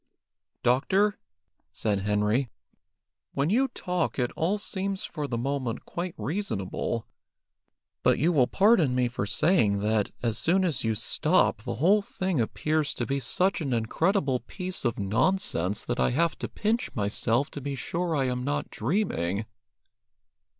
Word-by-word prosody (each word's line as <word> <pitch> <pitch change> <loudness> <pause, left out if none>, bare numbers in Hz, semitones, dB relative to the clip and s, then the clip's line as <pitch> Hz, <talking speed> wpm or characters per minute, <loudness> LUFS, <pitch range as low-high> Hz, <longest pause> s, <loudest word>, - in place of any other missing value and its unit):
"Doctor," 190 +12 +2 0.5
said 105 -2 0
Henry, 105 +5 +1 0.8
"when 140 +5 0
you 260 +5 +3
talk 180 -7 -2
it 125 -2 0
all 180 +6 +1
seems 195 -1 -2
for 150 -3 -4
the 120 - -2
moment 130 -1 -2
quite 175 0 -4
reasonable, 115 - -3 1.0
but - - +3
you 165 +5 +3
will 130 -5 +4
pardon 190 - +4
me 125 -1 +2
for 120 -5 -3
saying 115 - +3
that, 105 0 +1
as 115 -3 0
soon 185 +3 +3
as 160 -8 0
you 110 -1 +1
stop, 150 - +2
the - - -4
whole 190 - +4
thing 185 -7 -1
appears 155 +6 -1
to - - -2
be 140 0 -1
such 185 +9 +1
an 135 -5 -1
incredible 135 - +1
piece 185 -1 -5
of 120 - 0
nonsense 105 - 0
that 120 - -2
I - - +3
have 160 +6 +1
to - - -4
pinch 230 +4 -1
myself 115 +5 0
to 145 - -6
be 140 +1 -3
sure 170 +4 -2
I 135 -2 +1
am 125 -1 -1
not 145 +2 -2
dreaming." 105 - -1
140 Hz, 150 wpm, -27 LUFS, 115-185 Hz, 1.0 s, will